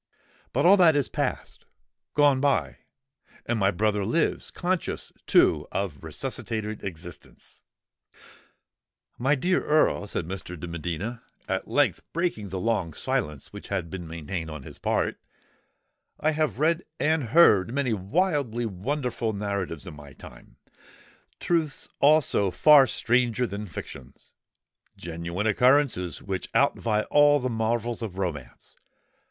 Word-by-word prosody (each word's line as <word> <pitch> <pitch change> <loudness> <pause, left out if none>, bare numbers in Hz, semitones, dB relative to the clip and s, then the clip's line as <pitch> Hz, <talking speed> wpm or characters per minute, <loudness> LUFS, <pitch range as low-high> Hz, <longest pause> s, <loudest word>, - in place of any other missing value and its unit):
But 140 +6 +1
all 195 +3 +7
that 170 -5 +6
is 145 -3 +1
passed—gone 145 -2 -2
by; 90 - +1 0.7
and 120 -1 -1
my 95 -1 +3
brother 105 +1 0
lives—conscious, 170 - -1
too, - - +4
of 95 -8 -3
resuscitated 110 -2 -4
existence!" 85 -2 -10 1.6
"My 135 +5 +3
dear 180 +7 +1
Earl," 150 -8 +2
said 85 - -3
Mr. 90 -1 -7
de 90 - -6
Medina, 85 +8 -4 0.3
at - - -2
length - - +1
breaking 165 - -2
the 95 +1 -4
long 95 -6 -1
silence 75 -2 -3
which - - -9
had 90 -5 -3
been 90 -3 -6
maintained 80 +1 -5
on 75 -3 -8
his - - -12
part, - - -1 1.0
"I 155 - +2
have 155 -1 -1
read 165 +3 +1 0.2
and 155 -3 +1
heard 115 - +5
many 135 -3 0
wildly 125 - 0
wonderful 115 +3 -2
narratives 100 -5 -3
in 90 - -8
my 70 -2 -12
time,—truths 160 - -6
also 145 -9 +4
far 140 - +6
stranger 120 0 +1
than 105 -1 -5
fictions,—genuine 85 - -9
occurrences 125 - +2
which 95 -2 -4
outvie 110 -2 +1
all 145 0 +6
the 130 -1 -2
marvels 115 +1 -1
of 100 -5 -5
romance. 75 -10 -5
110 Hz, 120 wpm, -26 LUFS, 90-140 Hz, 1.6 s, all